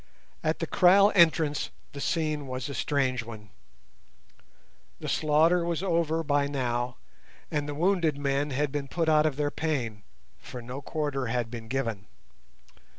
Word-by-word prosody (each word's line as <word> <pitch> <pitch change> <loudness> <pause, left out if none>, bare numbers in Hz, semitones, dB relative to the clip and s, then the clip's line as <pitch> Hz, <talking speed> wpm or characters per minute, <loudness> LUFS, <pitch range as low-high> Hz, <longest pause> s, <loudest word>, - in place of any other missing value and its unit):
At - - +1
the - - -2
kraal 195 +3 +5
entrance 160 -5 +3 0.2
the 140 - -7
scene 155 -4 -1
was 130 -1 -4
a 140 - -5
strange 130 -4 0
one. 110 -4 -11 1.5
The - - -6
slaughter 160 +3 +3
was 170 +1 -2
over 165 -3 +1
by 145 -1 +1
now, 125 -3 -2 0.5
and 145 -1 -1
the 145 - -4
wounded 170 -2 +1
men 140 +1 0
had 145 +1 -1
been 140 -1 -3
put 165 +3 -1
out 155 0 +5
of 150 - -2
their 145 0 -1
pain, 125 -10 -2 0.4
for 125 - -9
no 125 +3 -7
quarter 145 -3 -2
had 120 -1 -2
been 115 -2 -7
given. 115 -6 -3
145 Hz, 150 wpm, -28 LUFS, 130-160 Hz, 1.5 s, kraal